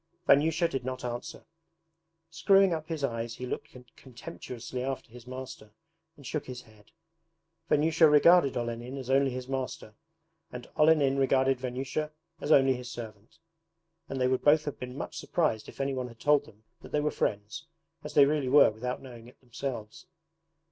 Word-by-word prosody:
Vanyusha 160 +4 +4
did 135 -5 -4
not 130 0 -5
answer. 120 0 -6 0.9
Screwing 195 +2 +4
up 155 -1 -4
his 160 -4 -4
eyes 115 -2 -2
he 125 - -6
looked - - -5 0.3
contemptuously 125 0 -8
after 130 -3 -4
his 125 0 -13
master, 130 -5 -9 0.4
and 140 - -15
shook 145 +5 -4
his 125 -1 -7
head. 110 -3 -21 0.8
Vanyusha 160 +2 +4
regarded 150 -1 +5
Olenin 120 +2 -4
as 130 -1 -5
only 135 0 +4
his 125 0 -6
master, 130 -5 -4 0.6
and 125 -1 -8
Olenin 150 -3 +4
regarded 135 -1 +2
Vanyusha 130 +4 -3 0.3
as 150 - -3
only 135 -2 +6
his 125 -1 -7
servant; 110 -3 -10 0.7
and 135 - -4
they 125 - +2
would 130 0 +1
both 150 +1 +4
have 145 - -5
been 125 +1 -7
much - - -5
surprised 110 -1 -1
if - - -14
anyone 135 -2 -2
had 115 -2 -14
told 145 -1 +3
them 105 -3 -19 0.2
that - - -12
they 150 - +1
were 150 +1 0
friends, 105 +11 -3 0.4
as - - -8
they 145 - +8
really 145 -2 0
were 145 -3 +7
without 125 +5 -5
knowing 120 -3 -11
it 125 - -18
themselves. 120 +1 -7
130 Hz, 170 wpm, -29 LUFS, 120-145 Hz, 0.9 s, they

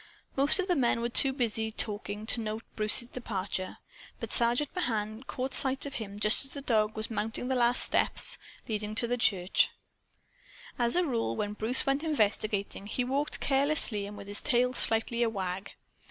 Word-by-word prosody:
Most 275 +2 +5
of 375 -1 -1
the 360 - +1
men 240 -3 +1
were 235 - -2
too 270 +3 +5
busy, 225 -4 -1
talking, 210 -1 -4
to 230 - +1
note 220 +1 -5
Bruce's 215 +2 +3
departure. 200 -6 -5 0.4
But - - -6
Sergeant 240 +4 +1
Mahan 220 - -2
caught 260 0 -4
sight 265 0 +3
of 280 - -7
him 205 -4 -5
just 210 +4 +3
as 270 - -1
the 280 - -5
dog 220 -3 0
was 220 +2 -3
mounting 225 +3 -4
the 260 - 0
last 245 0 +4
of - - -4
the - - +2
steps - - +3 0.3
leading 210 -1 -3
into 215 +3 -2
the 245 +1 -1
church. 190 -5 +2 1.1
As 235 -1 +3
a 360 0 +2
rule, 230 - -2
when 205 - -3
Bruce 220 +4 +5
went 275 +2 0
investigating, 210 -8 -1
he 250 - -2
walked 275 +4 -2
carelessly 270 -7 +1
and 205 0 -10
with - - -10
his 205 0 -3
tail 250 -2 +1
slightly 235 0 0
a 235 - +2
wag. 190 -2 -5
230 Hz, 190 wpm, -29 LUFS, 210-260 Hz, 1.1 s, Most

